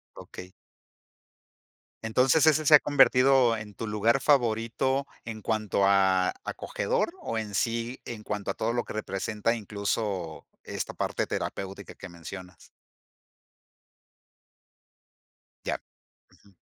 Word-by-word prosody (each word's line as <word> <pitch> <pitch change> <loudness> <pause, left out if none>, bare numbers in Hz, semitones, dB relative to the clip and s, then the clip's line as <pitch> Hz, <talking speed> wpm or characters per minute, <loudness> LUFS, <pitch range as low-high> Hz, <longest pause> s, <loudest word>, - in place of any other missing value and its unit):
Okey. 90 0 -10 1.5
Entonces, 125 +7 +3
¿ese 155 0 +4
se 150 - +9
ha - - +8
convertido 130 -4 +5
en 105 -2 -8
tu 115 - -5
lugar 110 +5 +2
favorito 130 +1 +1 0.2
en 110 -1 -7
cuanto 105 -3 0
a 95 -2 +3
acogedor 485 -8 -2
o 115 - -3
en 105 -2 -4
sí 115 +4 -1
en 110 -3 -7
cuanto 105 -2 -3
a - - -7
todo 115 +1 -1
lo 120 - 0
que - - -10
representa, 105 +2 -2
incluso, 100 -5 -3 0.2
esta - - -4
parte - - -2
terapéutica 95 0 -5
que - - -10
mencionas? 90 0 -10 3.0
Ya. - - -1 0.5
Ujú. 100 -1 -24
110 Hz, 115 wpm, -27 LUFS, 100-125 Hz, 3.0 s, se